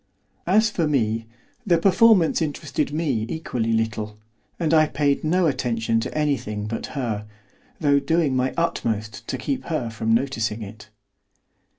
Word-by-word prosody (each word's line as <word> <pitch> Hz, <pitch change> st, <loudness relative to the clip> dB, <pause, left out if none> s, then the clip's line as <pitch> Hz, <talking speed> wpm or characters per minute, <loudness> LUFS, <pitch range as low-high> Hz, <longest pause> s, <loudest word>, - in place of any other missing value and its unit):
As 215 Hz, +4 st, +4 dB
for 170 Hz, -6 st, 0 dB
me, 115 Hz, -5 st, 0 dB, 0.4 s
the 180 Hz, -7 st, +3 dB
performance 190 Hz, -1 st, +4 dB
interested 145 Hz, -2 st, -2 dB
me 145 Hz, -8 st, 0 dB
equally 125 Hz, -8 st, -2 dB
little, 110 Hz, -1 st, -1 dB, 0.4 s
and 165 Hz, -2 st, +1 dB
I 155 Hz, -1 st, +5 dB
paid 145 Hz, -2 st, 0 dB
no 175 Hz, +3 st, +2 dB
attention 115 Hz, -6 st, 0 dB
to 115 Hz, -, -4 dB
anything 130 Hz, -9 st, -1 dB
but 115 Hz, +1 st, -4 dB
her, 110 Hz, -5 st, -2 dB, 0.5 s
though 145 Hz, -3 st, +3 dB
doing 160 Hz, -2 st, +1 dB
my 130 Hz, 0 st, +1 dB
utmost 110 Hz, -9 st, -2 dB
to -, -, -2 dB
keep 275 Hz, -2 st, -3 dB
her 150 Hz, -9 st, -2 dB
from 110 Hz, 0 st, -2 dB
noticing 115 Hz, -3 st, 0 dB
it. 105 Hz, +1 st, -11 dB
135 Hz, 145 wpm, -23 LUFS, 110-160 Hz, 0.5 s, I